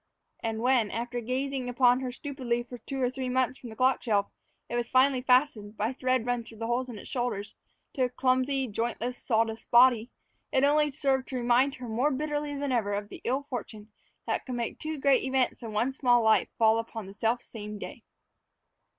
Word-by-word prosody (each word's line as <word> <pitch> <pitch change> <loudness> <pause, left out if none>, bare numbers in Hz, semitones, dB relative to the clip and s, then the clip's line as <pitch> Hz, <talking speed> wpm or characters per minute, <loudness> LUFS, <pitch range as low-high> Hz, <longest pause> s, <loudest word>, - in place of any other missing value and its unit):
And 225 -1 -3
when, 245 -3 +3
after 240 +2 -3
gazing 265 +3 -2
down - - -4
upon 245 0 +4
her 255 -1 -3
stupidly 250 -3 -3
for 245 0 -10
two 270 +4 -6
or 250 -1 +1
three 260 -1 -4
months 255 0 0
from 245 - -9
the 220 - -10
clock 255 +2 +2
shelf, 205 -3 0 0.4
it 240 - -4
was 240 0 -1
finally 260 0 +4
fastened, 250 -5 +2
by 220 +5 -1
thread 255 -2 0
run 245 -1 -1
through 225 0 -13
the 225 - -4
holes 245 +2 -1
in 230 - -7
its - - -10
shoulders, 240 -5 -3 0.4
to 260 -3 +1
a - - -2
clumsy, 260 +1 +1
jointless, 235 +2 -2
sawdust 225 -1 -1
body, 240 -1 +5 0.4
it 265 - +2
had 285 - +6
only 300 0 +3
served 265 -2 0
to 260 - -6
remind 245 +3 +3
her 250 -1 -8
more 240 +6 +1
bitterly 295 +1 -2
than 280 -1 -2
ever 210 -5 +1
of 205 0 -4
the - - -10
ill 265 +4 0
fortune 220 -4 -7 0.3
that - - -1
could 255 - -5
make 235 -1 -3
two 310 0 -4
great 275 -1 +3
events 260 -1 0
in 230 -2 -6
one 235 +5 0
small 245 -3 +3
life 220 0 +4
fall 220 0 +4
upon 225 -2 -6
the 195 - -10
selfsame 220 -1 -3
day. - - -8
245 Hz, 210 wpm, -28 LUFS, 225-265 Hz, 0.4 s, had